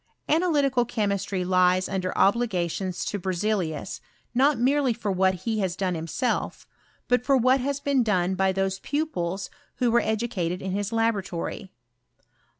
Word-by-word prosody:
Analytical 290 -6 +2
chemistry 200 -5 -1
lies 185 0 +3
under 185 -1 -2
obligations 190 -4 +1
to 205 - -3
Berzelius, 185 -3 -2 0.3
not 275 +4 +3
merely 265 +1 +2
for 215 -3 -3
what 190 -1 +1
he 220 -2 0
has 185 -3 -1
done 190 -2 -1
himself, 165 +9 -2 0.4
but 245 0 +2
for 275 +1 +3
what 255 +2 +4
has 280 +2 -2
been 280 -2 +1
done 190 -5 +1
by 190 0 +2
those 190 0 -1
pupils 200 - -2 0.2
who 245 -2 +1
were 240 +1 +4
educated 215 -6 -1
in 190 0 -4
his 205 +2 -2
laboratory. 205 -4 -2
205 Hz, 145 wpm, -25 LUFS, 185-245 Hz, 0.4 s, what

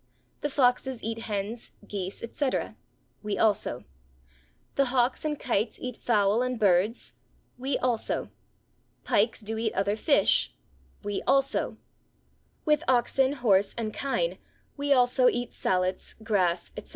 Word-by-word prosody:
The 295 - -2
foxes 255 -2 +1
eat 225 +1 -3
hens, 210 +3 -4
geese, 195 0 -5
etc.; 260 +3 -2 0.5
we 210 -2 -2
also. 200 - +1 0.9
The 275 - +3
hawks 250 0 +1
and 300 -2 -2
kites 220 -2 0
eat 250 -2 -5
fowl 210 -1 +2
and 255 -2 -1
birds; 200 +2 +2 0.5
we 265 +1 0
also. 245 -3 -1 0.7
Pikes 220 +3 +2
do 220 +1 -4
eat 225 -1 -1
other 200 +2 +1
fish; 280 +7 +3 0.5
we 205 -1 -2
also. 275 0 +2 0.9
With 300 +1 +3
oxen, 260 +2 +3
horse, 205 -7 +2
and 220 -2 -3
kine, 285 - -1 0.4
we 285 0 -2
also 250 -1 +4
eat 245 0 -3
sallets, 185 0 -1
grass, 180 -6 +1
etc. - - -8
235 Hz, 125 wpm, -27 LUFS, 205-260 Hz, 0.9 s, also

